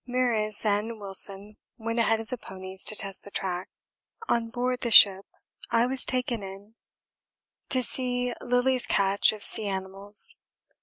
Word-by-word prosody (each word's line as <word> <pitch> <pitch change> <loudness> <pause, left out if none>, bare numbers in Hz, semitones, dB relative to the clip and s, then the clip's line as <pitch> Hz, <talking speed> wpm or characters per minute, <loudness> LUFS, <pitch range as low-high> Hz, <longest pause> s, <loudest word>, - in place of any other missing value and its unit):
Meares 230 -4 0
and 215 +2 -1
Wilson 200 +1 -1 0.2
went 230 +1 -3
ahead 225 -1 +2
of 225 - -9
the 250 - -4
ponies 190 -1 -8
to 215 - -1
test 195 -2 -4
the - - -12
track. 185 -2 -4 0.6
On 230 -1 0
board 250 +1 -2
the 240 - -2
ship 200 -3 +8 0.4
I 230 +1 +2
was 260 +1 +2
taken 250 -3 -2
in 195 +2 -11 1.0
to 255 -1 0
see 250 -1 0
Lillie's 250 +1 0
catch 200 0 +2
of 215 -1 -9
sea 215 - +2
animals. 195 +1 -1
215 Hz, 150 wpm, -26 LUFS, 195-245 Hz, 1.0 s, ship